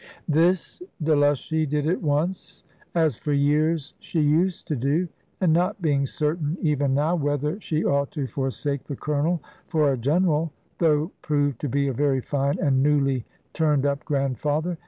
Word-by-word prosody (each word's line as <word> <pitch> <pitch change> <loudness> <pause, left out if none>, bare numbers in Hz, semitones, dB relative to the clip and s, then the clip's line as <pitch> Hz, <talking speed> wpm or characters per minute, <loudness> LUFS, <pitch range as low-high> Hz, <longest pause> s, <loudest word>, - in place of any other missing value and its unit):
This 170 - +1 0.2
Delushy 150 0 +2
did 150 0 0
at 170 +4 0
once, 160 +4 -2 0.3
as 160 -8 +2
for 150 - -2
years 150 +2 +1
she 165 - -3
used 160 +5 +2
to 150 - 0
do; 140 +8 0 0.3
and 180 -4 +3
not 180 +4 +1
being 145 -5 +1
certain 150 +2 -1
even 145 -4 +1
now 150 +4 +2
whether 150 +4 -1
she 160 -3 -1
ought 140 0 +1
to 145 -4 -2
forsake 135 +1 -3
the 140 - -5
Colonel 150 +3 -1 0.2
for 155 -4 +2
a - - -2
General, 160 +3 +1 0.3
though 155 0 +2
proved 145 -4 0
to 145 - -2
be 140 +3 +1
a 135 - -1
very 140 +1 +1
fine 140 +2 -1
and 135 -2 +2
newly 135 -4 +2 0.3
turned 150 -4 +2
up 140 0 0
Grandfather. 150 +4 -1
150 Hz, 160 wpm, -24 LUFS, 140-160 Hz, 0.3 s, and